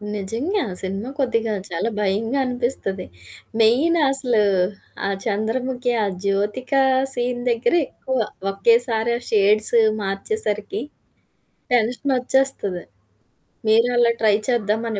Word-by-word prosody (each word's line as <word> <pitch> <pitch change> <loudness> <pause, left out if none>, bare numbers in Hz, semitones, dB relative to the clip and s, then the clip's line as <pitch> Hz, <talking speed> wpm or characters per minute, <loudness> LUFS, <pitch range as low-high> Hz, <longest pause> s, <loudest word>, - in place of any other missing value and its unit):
నిజంగా, 235 - -2 0.2
సినిమా 195 +6 -4
కొద్దిగా 230 -4 0 0.2
చాలా 175 +6 -2
భయంగా 220 +7 0
అనిపిస్తది. 240 -6 -3 0.6
మెయిన్ 275 +10 +3
అసలు, 250 -5 +2 0.7
ఆ - - -1
'చంద్రముఖి', 245 +4 -2
ఆ - - +1 0.2
జ్యోతిక 205 +7 -2 0.4
సీన్ 245 -1 -2
దగ్గరే 240 +8 +2
ఎక్కువ 260 0 -5 0.3
ఒకేసారి 230 +3 +2
ఆ - - -17
షేడ్స్ 215 +1 +4 0.3
మార్చేసరికి 205 - 0 0.9
టెన్షనొచ్చేస్తది. 250 -4 +1 0.9
మీరు 230 +2 +4
అలా 240 -1 +4
ట్రై 215 -2 +4
చేద్దామని 220 -2 -1
230 Hz, 95 wpm, -21 LUFS, 210-250 Hz, 0.9 s, షేడ్స్